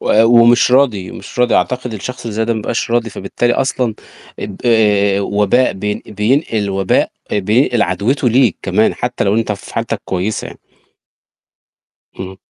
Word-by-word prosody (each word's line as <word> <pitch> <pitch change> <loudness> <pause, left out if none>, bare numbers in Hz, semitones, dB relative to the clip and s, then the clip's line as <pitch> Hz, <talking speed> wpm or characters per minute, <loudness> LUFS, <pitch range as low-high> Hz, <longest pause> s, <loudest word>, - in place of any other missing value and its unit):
و 110 - +3
ومش 120 +1 +5
راضي، 120 -9 +2
مش - - -10
راضي 125 -1 +3
أعتقد 125 -2 -1
الشخص 125 +4 -6
اللي 115 -3 -6
زي 110 - 0
ده 115 - 0
ما 110 - -2
بيبقاش 115 +2 -3
راضي 120 -1 0
فبالتالي 120 +5 -2
أصلًا 125 -4 -1 0.4
ب 100 - -6
آآ 105 -4 +3
وباء 105 +5 +1
بين 105 +2 -4
بينقل 110 0 0
وباء 95 -1 +1 0.2
بينقل 110 +4 +2
عدوِته 125 +4 0
ليك 120 -4 +3
كمان، 100 +4 +1
حتّى 125 -2 -3
لو 100 +1 +1
أنت 115 -2 0
في 100 - -10
حالتك - - -3
كويسة 95 +4 -3
يعني. - - -12 1.6
اهم. 95 0 -7
110 Hz, 160 wpm, -16 LUFS, 100-120 Hz, 1.6 s, ومش